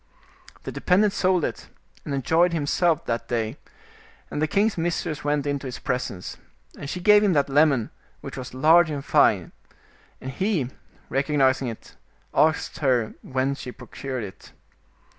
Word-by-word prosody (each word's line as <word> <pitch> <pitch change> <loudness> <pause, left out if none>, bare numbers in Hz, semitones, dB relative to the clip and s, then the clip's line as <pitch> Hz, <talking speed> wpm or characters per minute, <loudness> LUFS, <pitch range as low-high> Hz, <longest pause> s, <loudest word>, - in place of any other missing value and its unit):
The - - -5
dependent 195 +3 +2
sold 185 -3 +2
it, - - -6 0.4
and - - -5
enjoyed 165 +6 +2
himself 165 +1 +1
that 115 0 -2
day, 115 +2 -2 0.7
and 150 - -3
the 155 - +2
king's 205 +6 +1
mistress 165 -2 -2
went 145 -1 0
into 140 -1 -2
his 125 - -6
presence. 125 -8 -4 0.4
And 140 - -7
she 180 - -4
gave 210 +3 +6
him 200 -3 +3
that 145 -2 +2
lemon, 140 -5 +3 0.3
which - - -7
was 130 -1 -7
large 160 +5 +5
and 145 -2 -4
fin% - - +3 0.7
and 130 - -6
he, 165 - -1 0.4
recognizing 135 -2 +1
it, 115 -2 -9 0.4
asked 160 +1 +1
her 125 -7 +1
whence 130 +1 -2
she 125 - -6
procured 130 0 -6
it. 95 -2 -11
145 Hz, 150 wpm, -24 LUFS, 130-170 Hz, 0.7 s, gave